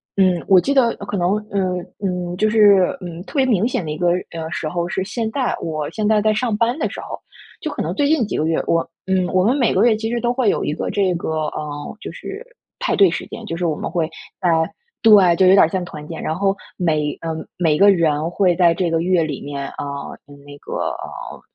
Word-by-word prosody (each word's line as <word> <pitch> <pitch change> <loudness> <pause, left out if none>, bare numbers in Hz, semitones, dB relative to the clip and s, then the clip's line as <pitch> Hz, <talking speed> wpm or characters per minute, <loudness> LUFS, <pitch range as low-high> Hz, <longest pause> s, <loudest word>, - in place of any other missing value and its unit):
嗯， 185 -3 +2
我 185 -2 +6
记 280 - -1
得 240 -4 +3
可 200 0 -4
能 180 +3 +2 0.2
嗯。 185 -3 -1 0.2
嗯， 180 -2 -3
就 215 - +2
是， 205 -4 +5
嗯， 170 -2 -7
特 - - -13
别 270 - +3
明 220 -2 +2
显 245 - -2
的 155 - -6
一 150 - -3
个， 175 +1 +2 0.2
呃， 160 -1 -5
时 170 -2 -3
候 175 +1 -2
是 190 - -2
现 220 +3 -3
在。 260 0 -1
我 155 -2 -3
现 215 -1 -2
在 215 -1 +3
在 215 +1 +3
上 220 0 0
班 230 +5 +1
的 - - 0
时 - - -7
候， - - -7 0.4
就 - - -3
可 - - -4
能 - - -2
最 290 - +1
近 300 -5 +3
几 - - -3
个 155 - 0
月， 160 0 +1
我 165 0 +1 0.2
嗯， 190 -1 +2
我 185 0 +3
们 245 +8 +2
每 245 -5 +2
个 190 - +3
月 230 - +4
其 225 +1 -3
实 240 - -1
都 240 - +1
会 245 -4 +2
有 - - -2
一 - - -1
个 - - -3
这 190 -3 +1
个 170 - -4 0.2
呃， 150 +6 -6
就 - - -7
是 415 +5 -8 0.3
派 - - 0
对 195 -3 +6
时 - - -4
间， - - -8
就 165 - -4
是 175 - -2
我 160 -3 0
们 - - -4
会 165 -3 0 0.3
在 180 - +1 0.5
对， 200 -6 +6
就 185 +1 +4
有 185 - +7
点 - - +7
儿 - - +4
像 185 +2 -2
团 150 -3 -9
建， 165 - -6
然 160 - -2
后 195 +1 +1 0.2
每 155 -5 0
呃， 165 -1 -3 0.2
每 160 -4 +2
个 200 +4 +6
人 160 -4 +2
会 180 0 +2
在 175 -1 +5
这 175 -1 -1
个 165 0 +1
月 175 -1 +2
里 150 -4 -4
面， 140 -1 -5
啊， - - -14 0.7
那 145 0 -11
个 - - -8 0.2
呃， - - -8
185 Hz, 265 characters per minute, -20 LUFS, 165-215 Hz, 0.7 s, 有